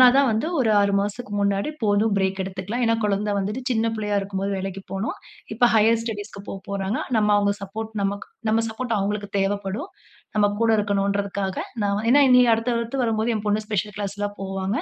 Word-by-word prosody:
நானா 255 - +10
தான் 275 -1 +5
வந்து 220 +8 0
ஒரு 225 -3 +3
6 200 0 +2
மாசத்துக்கு 205 +2 -4
முன்னாடி, 200 +7 +1
போதும் 205 0 +2
பிரேக் 190 0 0
எடுத்துக்கலாம். 195 +6 -3
ஏன்னா, 230 0 +3
குழந்தை 205 0 0
வந்துட்டு 210 +6 -2
சின்ன 225 0 +1
பிள்ளையா 210 -1 0
இருக்கும்போது 195 0 -3
வேலைக்கு 195 0 -5
போனோம். 195 +3 -3 0.4
இப்ப 240 +2 +4
ஹையர் 225 +1 +4
ஸ்டடீஸ்க்கு 205 -3 -6
போ - - -4 0.2
போறாங்க. 195 +1 -1 0.2
நம்ம 210 -1 +2
அவுங்க 200 0 +2
சப்போர்ட் 220 +3 -6
நமக்கு 200 +1 -2 0.2
நம்ம 225 +1 +3
சப்போர்ட் 230 0 -2
அவுங்களுக்கு 205 +1 -2
தேவைப்படும். 200 - -2 0.5
நம்ம 205 -1 +5
கூட 230 -1 +3
இருக்கணுன்றதுக்காக. 200 -1 -1 0.3
நான் 200 0 +1
வ - - -1
ஏன்னா 285 +2 +6
இனி 250 0 +8
அடுத்து, 225 +2 -1
அடுத்து 235 +3 -3
வரும்போது 225 0 +1
என் 210 0 -5
பொண்ணு 210 +1 0
ஸ்பெஷல் 210 0 -2
கிளாஸ்லாம் 205 0 -4
போவாங்க. 195 +2 -2
205 Hz, 185 wpm, -23 LUFS, 200-225 Hz, 0.5 s, நானா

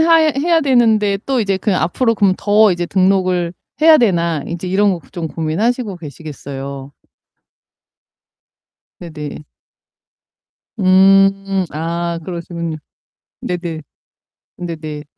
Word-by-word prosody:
하야 320 -1 +4
해야 330 +3 +2
되는데 225 -7 +2
또 265 -3 +1
이제 195 -3 0
그냥 190 -3 0
앞으로 230 +8 +1
그럼 195 -3 +2
더 210 +1 +4
이제 175 0 -3
등록을 185 -2 +1 0.3
해야 320 0 +7
되나?' 170 - +1
인제 170 +2 -5
이런 200 +2 +2
거 175 - -4
좀 170 -3 -4
고민하시고 200 +8 -2
계시겠어요. 140 -3 -8 2.1
네네. 155 -3 -8 1.4
음, 195 0 +4
아, 170 +2 -3
그러시군요. 170 -2 -5 0.6
네네. 170 -3 -4 0.8
네네. 155 -4 -6
185 Hz, 220 characters per minute, -17 LUFS, 165-205 Hz, 2.1 s, 해야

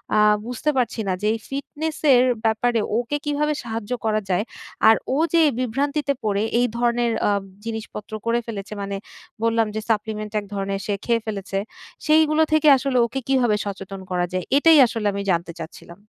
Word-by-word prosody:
আ - - +4 0.3
বুঝতে 245 +5 -2
পারছি 245 -2 0
না 190 - +1
যে 210 - 0
এই 225 - -3
ফিটনেসের 280 -1 +1 0.2
ব্যাপারে 225 +1 +2 0.2
ওকে 245 +5 -1
কীভাবে 295 +1 0
সাহায্য 225 -1 -5
করা 215 -1 +1
যায়। 185 +3 +1 0.4
আর 225 - +8 0.2
ও - - +1 0.2
যে 335 - +5 0.2
বিভ্রান্তিতে 280 +4 0
পড়ে 205 -1 0 0.2
এই 245 - +3
ধরনের 240 0 +1 0.2
আ - - +3 0.4
জিনিসপত্র 220 -2 -6
করে 230 +1 +2
ফেলেছে 210 -2 -6
মানে 200 0 -3 0.5
বললাম 230 -1 +2
যে 220 - -2
সাপ্লিমেন্ট 215 -1 -1
এক 205 - -9
ধরনের 195 0 -2
সে 205 - -1
খেয়ে 230 -1 +1
ফেলেছে। 200 -3 -4 0.5
সেইগুলো 310 0 +4
থেকে 310 0 +4
আসলে 265 -1 -1
ওকে 250 +3 -4
কীভাবে 245 -5 +3
সচেতন 195 -1 -6
করা 180 -1 +1
যায়? 185 -1 -2
এটাই 320 +2 +6
আসলে 225 -3 -2
আমি 200 - -3
জানতে 170 0 -1
চাচ্ছিলাম। 170 +2 -10
230 Hz, 170 wpm, -22 LUFS, 205-270 Hz, 0.5 s, আর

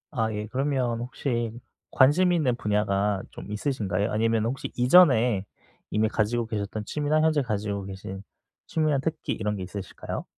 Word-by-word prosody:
아 110 -2 +1
예. 105 0 -3
그러면 130 -1 0
혹시 120 -1 -2 0.4
관심 165 +7 +5
있는 145 -8 +2
분야가 105 -3 0
좀 - - -9
있으신가요? 105 -4 -1
아니면은 115 +1 +1
혹시 135 - -6
이전에 125 - +5 0.5
이미 110 +1 +2
가지고 115 +2 0
계셨던 105 -1 -4
취미나 150 +3 +1
현재 155 -2 +3
가지고 105 -4 -2
계신 95 0 -7 0.5
취미나 155 -3 +1
특기 160 +3 -3
이런 105 -1 -2
게 95 - -5
있으실까요? 95 0 -6
115 Hz, 345 characters per minute, -26 LUFS, 105-135 Hz, 0.5 s, 관심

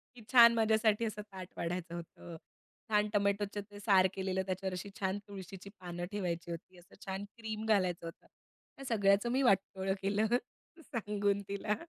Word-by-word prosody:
की 240 - -12
छान 235 -2 +9
माझ्यासाठी 220 0 +3
असं 215 -1 -4
ताट 185 -2 -7
वाढायचं 170 0 -3
होतं. 170 0 -9 0.5
छान 210 -1 +3
टोमॅटोचं 200 0 +1
ते 205 - -10
सार 195 -3 +5
केलेलं 190 0 -1
त्याच्यावर 190 0 -2
अशी 180 +2 -5
छान 190 +1 0
तुळशीची 195 -1 -9
पानं 175 -1 -5
ठेवायची 175 -4 -3
होती, 175 +2 -8
असं 175 - -19
छान 195 +1 -3
क्रीम 220 -1 -4
घालायचं 185 -6 +2
होतं. 165 - -11 0.5
ह्या 275 - -9
सगळ्याचं 200 +2 +3
मी 260 +2 +2
वाटोळं 195 -3 +2
केलं 200 +2 +1 0.6
सांगून 205 -6 -1
तिला. 200 +1 -1
200 Hz, 155 wpm, -33 LUFS, 185-210 Hz, 0.6 s, छान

